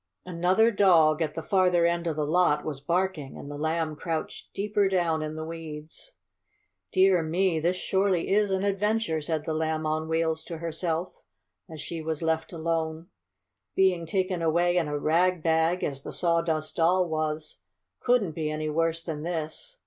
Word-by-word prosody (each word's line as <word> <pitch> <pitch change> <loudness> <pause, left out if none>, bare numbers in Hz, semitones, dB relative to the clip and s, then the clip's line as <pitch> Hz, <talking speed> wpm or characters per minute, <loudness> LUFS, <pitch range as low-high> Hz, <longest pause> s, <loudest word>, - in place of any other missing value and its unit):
Another 185 +6 +3
dog, 170 -6 +4
at 155 -2 -1
the 165 - -4
farther 180 -3 +3
end 170 0 0
of 160 - -1
the 150 -1 -1
lot, 155 -2 +2
was 145 -3 -4
barking, 170 -3 -1
and 140 - -8
the 145 - -6
Lamb 160 0 -1
crouched 160 0 -5
deeper 205 0 +1
down 170 -4 +1
in 155 0 -4
the 155 0 -5
weeds. 160 - -9 0.8
"Dear 185 -2 +4
me! 165 +1 +1
this 175 +3 +1
surely 190 -1 0
is 210 0 +3
an 190 0 0
adventure," 205 -3 0
said 155 0 -2
the 160 - -1
Lamb 160 0 -1
on 155 +1 -1
Wheels 160 -1 0
to 165 - -6
herself, 165 +1 -2 0.6
as 160 -1 -9
she 165 0 -5
was 160 0 -3
left 160 0 0
alone. 165 -1 -2 0.7
"Being 180 -3 +2
taken 185 0 -1
away 170 +2 +2
in 170 -3 +2
a 145 0 -2
rag 170 +3 +2
bag, 165 +2 +2
as 135 -1 -2
the - - -7
Sawdust 165 -2 0
Doll 180 +2 +3
was, 155 - -3 0.4
couldn't 240 -8 +2
be 155 -1 -3
any 155 0 -2
worse 165 +1 0
than 155 -3 -5
this. 170 - -5
165 Hz, 170 wpm, -27 LUFS, 155-180 Hz, 0.8 s, dog